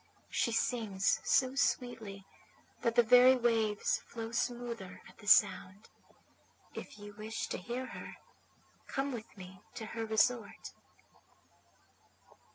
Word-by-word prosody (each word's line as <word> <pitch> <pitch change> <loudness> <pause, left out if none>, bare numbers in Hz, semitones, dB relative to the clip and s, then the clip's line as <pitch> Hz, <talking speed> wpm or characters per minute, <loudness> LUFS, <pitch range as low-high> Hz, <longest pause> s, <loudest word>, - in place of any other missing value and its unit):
She 235 - +1
sings 220 -4 0
so 260 -1 +3
sweetly 225 -7 -1 0.6
that 230 -1 0
the 240 - +6
very 250 +3 +7
waves 225 -4 +1
flow 225 -1 -6
smoother 235 -5 -3
at - - -18
the 205 - -13
sound. 195 0 +3 0.8
If - - -9
you 205 0 -10
wish 215 +2 -5
to - - -3
hear 240 +7 -4
her - - -9 0.7
come 275 +1 -2
with 225 -4 -8
me 185 0 -11
to 220 - -6
her 225 - -3
resort.' 220 0 0
225 Hz, 120 wpm, -33 LUFS, 205-245 Hz, 0.8 s, very